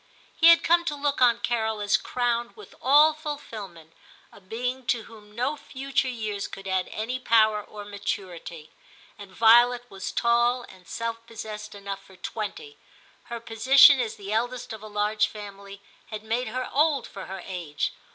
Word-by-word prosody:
He 330 Hz, -, +5 dB
had 335 Hz, 0 st, +8 dB
come 340 Hz, +1 st, +4 dB
to 300 Hz, -3 st, -1 dB
look 285 Hz, -1 st, -1 dB
on 235 Hz, -2 st, +5 dB
Carol 220 Hz, -2 st, -1 dB
as 205 Hz, -1 st, +2 dB
crowned 240 Hz, -1 st, -1 dB
with 425 Hz, -, -13 dB
all 295 Hz, +4 st, +6 dB
fulfilment, 215 Hz, -, -8 dB, 0.4 s
a -, -, -16 dB
being 250 Hz, +6 st, -4 dB
to 235 Hz, -2 st, +1 dB
whom 210 Hz, -2 st, -15 dB
no 255 Hz, +6 st, -1 dB
future 270 Hz, -1 st, -2 dB
years 215 Hz, -5 st, -3 dB
could 195 Hz, 0 st, -9 dB
add 190 Hz, -1 st, 0 dB
any 240 Hz, +4 st, -3 dB
power 220 Hz, -3 st, +3 dB
or 205 Hz, 0 st, -10 dB
maturity, 185 Hz, -6 st, -6 dB, 0.5 s
and 200 Hz, -1 st, -10 dB
Violet 240 Hz, +4 st, +5 dB
was 190 Hz, -1 st, -5 dB
tall 240 Hz, +1 st, +2 dB
and 185 Hz, -5 st, -16 dB
self 230 Hz, 0 st, -4 dB
possessed 215 Hz, -2 st, -8 dB
enough 200 Hz, -1 st, -6 dB
for 190 Hz, -, -17 dB
twenty; 225 Hz, -, -6 dB, 0.5 s
her 235 Hz, 0 st, -6 dB
position 260 Hz, +5 st, +6 dB
as 230 Hz, -3 st, -2 dB
the 200 Hz, +1 st, -6 dB
eldest 240 Hz, +1 st, -2 dB
of 220 Hz, -, -9 dB
a 215 Hz, -, -9 dB
large 210 Hz, 0 st, +1 dB
family 200 Hz, -1 st, -10 dB, 0.3 s
had 215 Hz, 0 st, -7 dB
made 230 Hz, +3 st, -1 dB
her 255 Hz, +3 st, -3 dB
old 290 Hz, -2 st, +2 dB
for 195 Hz, -, -9 dB
her 190 Hz, -1 st, -7 dB
age. 170 Hz, -6 st, -3 dB
225 Hz, 170 wpm, -26 LUFS, 205-250 Hz, 0.5 s, had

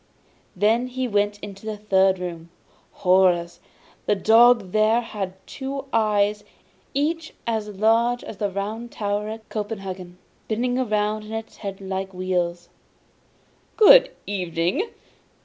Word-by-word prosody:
Then 220 Hz, +6 st, +2 dB
he 255 Hz, 0 st, -3 dB
went 205 Hz, -1 st, +1 dB
into 200 Hz, -1 st, -9 dB
the 215 Hz, -1 st, -3 dB
third 190 Hz, -2 st, +3 dB
room. 170 Hz, -2 st, -6 dB, 0.6 s
Horrors! 180 Hz, -2 st, +3 dB, 0.5 s
the 210 Hz, -, +3 dB
dog 225 Hz, -1 st, +5 dB
there 215 Hz, +2 st, +3 dB
had 200 Hz, -5 st, -5 dB
two 275 Hz, 0 st, -5 dB
eyes, 210 Hz, -2 st, +2 dB, 0.5 s
each 320 Hz, +3 st, -1 dB
as 220 Hz, -2 st, -1 dB
large 225 Hz, +4 st, +2 dB
as 210 Hz, -, -8 dB
the 205 Hz, 0 st, -1 dB
Round 215 Hz, +5 st, -4 dB
Tower 205 Hz, 0 st, -2 dB
at 220 Hz, 0 st, -8 dB
Copenhagen, 195 Hz, -4 st, -5 dB, 0.3 s
spinning 240 Hz, +3 st, -1 dB, 0.2 s
round 210 Hz, 0 st, 0 dB
in 215 Hz, -, -8 dB
his -, -, -22 dB
head 195 Hz, -2 st, -6 dB
like 190 Hz, 0 st, -4 dB
wheels. 175 Hz, -2 st, -2 dB, 1.1 s
'Good -, -, +8 dB, 0.2 s
evening! 180 Hz, -, -1 dB
210 Hz, 125 wpm, -23 LUFS, 190-225 Hz, 1.1 s, Good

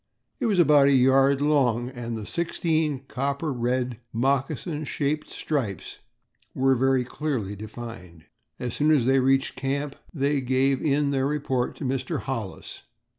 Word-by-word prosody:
It 250 Hz, -, 0 dB
was 205 Hz, -4 st, +1 dB
about 150 Hz, -4 st, +6 dB
a 140 Hz, -, +5 dB
yard 135 Hz, +1 st, +4 dB
long 125 Hz, -5 st, +2 dB
and 120 Hz, -2 st, -5 dB
the 110 Hz, -, -6 dB
sixteen 160 Hz, -, -1 dB
copper 140 Hz, +3 st, -2 dB
red, 125 Hz, 0 st, -1 dB
moccasin 140 Hz, +5 st, -1 dB
shaped 150 Hz, +1 st, -2 dB
stripes 120 Hz, -, -3 dB, 0.6 s
were 135 Hz, 0 st, +3 dB
very 130 Hz, 0 st, +2 dB
clearly 125 Hz, -8 st, -3 dB
defined. 105 Hz, -6 st, -9 dB, 0.3 s
As 120 Hz, -2 st, -4 dB
soon 150 Hz, +1 st, +1 dB
as 145 Hz, -6 st, +4 dB
they 135 Hz, +1 st, +4 dB
reached 135 Hz, +1 st, +2 dB
camp 135 Hz, +2 st, -2 dB, 0.2 s
they 140 Hz, -2 st, 0 dB
gave 130 Hz, +1 st, +1 dB
in 145 Hz, -1 st, +1 dB
their 135 Hz, -1 st, +1 dB
report 135 Hz, -4 st, -1 dB
to -, -, -8 dB
Mr. 135 Hz, +4 st, -2 dB
Hollis. 115 Hz, -8 st, -6 dB
135 Hz, 145 wpm, -25 LUFS, 125-145 Hz, 0.6 s, about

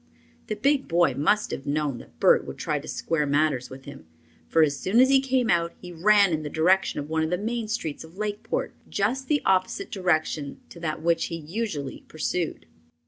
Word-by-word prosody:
The 215 Hz, -, -2 dB
big 275 Hz, +6 st, +1 dB
boy 170 Hz, -5 st, +3 dB
must 180 Hz, +11 st, +1 dB
have 135 Hz, -, -5 dB
known 145 Hz, -3 st, -1 dB
that -, -, -16 dB
Bert -, -, +5 dB
would -, -, -7 dB
try -, -, -1 dB
to -, -, -11 dB
square 150 Hz, -3 st, -1 dB
matters 145 Hz, -3 st, +1 dB
with 130 Hz, +1 st, -11 dB
him, 80 Hz, -, -11 dB, 0.4 s
for 160 Hz, -, +4 dB
as 145 Hz, -2 st, +2 dB
soon 210 Hz, +6 st, +2 dB
as 260 Hz, +1 st, +6 dB
he 270 Hz, -1 st, +5 dB
came 260 Hz, -3 st, +1 dB
out 170 Hz, -1 st, +1 dB
he 180 Hz, -, -9 dB
ran 200 Hz, +2 st, +4 dB
in 155 Hz, -, 0 dB
the 150 Hz, -, -5 dB
direction 180 Hz, +5 st, +2 dB
of 145 Hz, -, -5 dB
one 160 Hz, +1 st, 0 dB
of 160 Hz, -, 0 dB
the 180 Hz, -, 0 dB
main 225 Hz, +3 st, -3 dB
streets 190 Hz, -11 st, -3 dB
of 160 Hz, +3 st, -15 dB
Lakeport, 210 Hz, 0 st, -3 dB, 0.2 s
just 255 Hz, +7 st, -1 dB
the 295 Hz, -1 st, +1 dB
opposite 185 Hz, -1 st, +1 dB
direction 155 Hz, -6 st, -1 dB
to 170 Hz, -, -12 dB
that 160 Hz, -2 st, -3 dB
which 170 Hz, 0 st, +2 dB
he 170 Hz, -, -4 dB
usually 165 Hz, -3 st, -4 dB
pursued. 160 Hz, +2 st, -3 dB
170 Hz, 205 wpm, -26 LUFS, 155-210 Hz, 0.4 s, as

